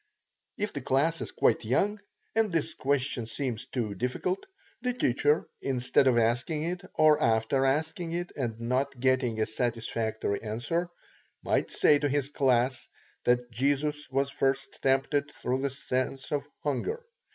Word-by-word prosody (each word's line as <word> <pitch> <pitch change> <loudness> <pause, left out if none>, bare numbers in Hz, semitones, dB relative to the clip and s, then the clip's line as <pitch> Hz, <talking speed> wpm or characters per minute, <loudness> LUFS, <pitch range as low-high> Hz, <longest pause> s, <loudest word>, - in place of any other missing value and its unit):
If 210 0 -2
the 145 - -4
class 145 +6 +1
is - - -4
quite - - +2
young, 200 - +1 0.4
and 225 -3 +2
this 165 -3 0
question 135 -3 -1
seems 125 0 -3
too 115 -5 -2
difficult, 125 - -1 0.4
the 250 0 0
teacher, 145 - +2
instead 130 0 +2
of 125 -2 +4
asking 120 +7 +1
it, 175 +2 -2
or 155 -1 +5
after 115 +4 +2
asking 160 +4 -1
it 175 +1 -3
and 115 -5 -3
not 130 +3 -1
getting 130 -3 +2
a 110 - +3
satisfactory 110 -2 -2
answer, 135 +11 -2 0.5
might - - +1
say 145 - +4
to 145 - +1
his 140 -1 0
class, 130 -3 +1 0.4
that 125 0 +2
Jesus 145 +5 0
was 135 +1 0
first 135 -1 -1
tempted 135 +2 +2
through 125 +1 -1
the 140 +1 0
sense 130 0 -3
of 145 -1 -1 0.2
hunger. 435 - -2
135 Hz, 150 wpm, -29 LUFS, 120-150 Hz, 0.5 s, or